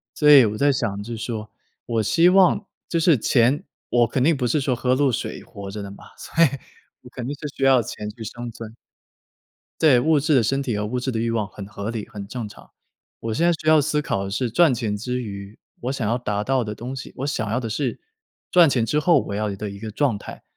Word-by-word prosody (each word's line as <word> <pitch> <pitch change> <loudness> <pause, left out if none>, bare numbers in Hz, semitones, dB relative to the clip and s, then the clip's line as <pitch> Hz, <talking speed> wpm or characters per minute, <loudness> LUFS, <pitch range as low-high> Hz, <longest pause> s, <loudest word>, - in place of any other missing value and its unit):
所 150 -1 +5
以 135 -5 +9
我 105 0 -2
在 145 +3 +3
想 110 -6 -2
就 115 +1 -6
是 - - -7
说， 110 -2 -5 0.4
我 115 -2 0
希 170 - +4
望 190 +1 +4 0.2
就 170 - -1
是 160 -4 +4
钱 125 +5 +2 0.2
我 120 -1 +3
肯 125 +3 0
定 160 +2 +4
不 125 - 0
是 145 +5 +1
说 135 -2 0
喝 125 +2 +1
露 140 -1 +2
水 - - -4
活 100 -1 -9
着 105 +1 -6
的 100 - -7
嘛， 100 - -13
所 165 - +1
以 - - +5 0.5
我 125 - -14
肯 125 -1 -7
定 145 - -3
是 150 - -6
需 - - -2
要 130 -2 +5
钱 105 -1 -6
去 110 +1 -9
生 120 +3 -6
存。 115 -1 -9 1.1
对， 140 -6 +6
物 155 +3 +3
质 150 +1 +2
的 125 - +4
身 135 +5 0
体 120 -6 -2
和 105 - -2
物 125 +4 -2
质 130 +1 -2
的 115 - -2
欲 115 +1 0
望 110 -3 -1
很 100 -1 -9
合 100 0 -6
理 115 -2 -5
很 105 -3 -8
正 120 0 -5
常， 105 - -15 0.5
我 115 -1 -3
现 165 +10 +1
在 175 - +5
需 155 -1 -6
要 155 -1 +6
思 150 +1 0
考 100 -8 -2
的 - - -5
是 120 +5 -1
赚 155 +3 +4
钱 110 -3 -2
之 125 +4 -3
余， 100 -1 -8 0.2
我 125 - -2
想 130 -6 -2
要 115 +3 +1
达 105 -4 -2
到 130 +1 +1
的 105 -1 -4
东 125 +5 -6
西， 130 - -8
我 135 - -3
想 110 -7 -2
要 115 +4 0
的 115 - -4
是 120 +3 -2 0.5
赚 175 -3 +6
钱 120 -4 +1
之 150 +6 +1
后 170 +2 +4
我 100 - -4
要 105 +1 -1
的 105 +1 -5
一 100 0 -9
个 110 0 -6
状 125 -1 +1
态。 - - -10
120 Hz, 275 characters per minute, -23 LUFS, 105-140 Hz, 1.1 s, 以